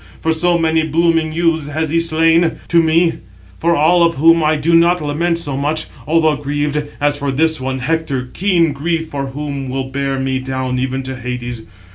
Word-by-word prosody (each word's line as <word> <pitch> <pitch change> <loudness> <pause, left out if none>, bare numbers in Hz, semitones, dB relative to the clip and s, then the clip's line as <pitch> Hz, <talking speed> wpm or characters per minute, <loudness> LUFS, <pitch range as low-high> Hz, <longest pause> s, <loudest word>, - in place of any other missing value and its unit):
For 160 - 0
so 175 +2 +2
many 160 -1 +1
blooming 165 0 +1
youths 160 -2 0
has 155 +1 -2
he 165 - +2
slain 165 0 +2 0.2
to 170 0 +4
me, 165 +1 +2 0.4
for 170 +1 +2
all 165 +4 +3
of 170 0 +3
whom 165 +3 +4
I 155 +1 +2
do 155 +3 0
not 170 +2 +4
lament 165 +3 -1
so 145 -5 -3
much, 150 +3 -1 0.2
although 160 -1 +3
grieved, 145 +1 -2 0.2
as 145 0 0
for 140 -1 -1
this 160 +2 +1
one, 130 0 -2
Hector, 140 -2 -2
keen 175 -5 +2
grief 160 +3 -2
for 140 -1 -4
whom 140 -1 -5
will 130 0 -4
bear 135 0 -2
me 130 0 -1
down 130 -1 -3
even 130 +1 -2
into 130 0 -6
Hades. 125 -1 -5
155 Hz, 190 wpm, -17 LUFS, 135-165 Hz, 0.4 s, to